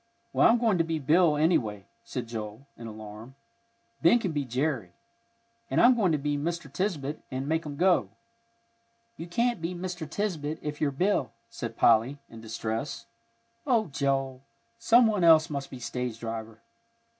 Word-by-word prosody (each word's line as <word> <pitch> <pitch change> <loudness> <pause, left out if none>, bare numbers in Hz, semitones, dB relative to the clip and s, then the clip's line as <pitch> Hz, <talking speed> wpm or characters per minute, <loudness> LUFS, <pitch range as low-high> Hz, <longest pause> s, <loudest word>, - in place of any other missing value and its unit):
"Well, - - +5
I'm 235 - +5
going 225 -6 +2
to - - +4
be 165 0 -2
Bill, 155 +2 +3
anyway," 115 - +1 0.2
said 125 -2 -5
Joel, 110 +2 -7
in 115 - -9
alarm. 110 +3 -10 0.7
"Ben 170 +8 +6
can 195 -7 -2
be 145 -2 -1
Jerry. 125 - -2 0.8
And - - +1
I'm 245 +2 +7
going 200 -7 +2
to 155 - +2
be 145 0 -1
Mr. 165 -2 -4
Tisbett 155 -6 -2
and 130 +1 -4
make 160 +1 -1
'em 145 - -6
go." 180 +3 +3 1.1
"You 165 - -8
can't 235 +2 0
be 170 +2 -3
Mr. 175 -3 -5
Tisbett 160 -5 -2
if 150 0 -5
you're 150 - +2
Bill," 145 0 0 0.2
said 115 -2 -6
Polly, 115 +5 +4
in 115 - -10
distress. 115 +4 -4 0.6
"Oh, 230 - +2
Joel, 135 -2 -1 0.4
some 230 +1 +5
one 210 -5 +1
else 160 -2 +6
must 140 -1 -4
be 130 - -8
stage 125 -1 -4
driver." 115 -1 -6
145 Hz, 165 wpm, -28 LUFS, 120-175 Hz, 1.1 s, I'm